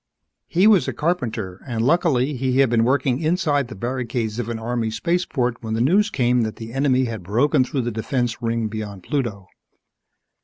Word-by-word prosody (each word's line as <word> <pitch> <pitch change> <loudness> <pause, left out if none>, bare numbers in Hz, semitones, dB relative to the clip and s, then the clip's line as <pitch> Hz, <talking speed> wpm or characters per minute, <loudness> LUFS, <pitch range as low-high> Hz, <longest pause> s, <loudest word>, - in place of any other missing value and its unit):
_ - - -60 0.4
He 180 +4 +2
was 210 -5 +5
a - - -2
carpenter 115 - -2
and 115 -2 -1
luckily, 150 -3 +2
he 130 0 0
had 135 -3 +4
been 115 -1 +3
working 130 0 +1
inside 155 -4 +1
the 120 - -9
barricades 120 0 -3
of 120 -1 -3
an 115 - -3
Army 115 0 -2
spaceport 125 -1 -1
when 110 -1 -3
the - - -1
news 190 - +3
came 125 -7 +2
that 110 -1 -2
the 115 0 -9
enemy 130 -1 +2
had 115 -4 -5
broken 125 - +2
through 130 +1 -2
the 120 0 -2
defense 120 +2 -2
ring 115 -1 -1
beyond 105 -3 -6
Pluto. 115 - -3
120 Hz, 190 wpm, -22 LUFS, 115-140 Hz, 0.4 s, was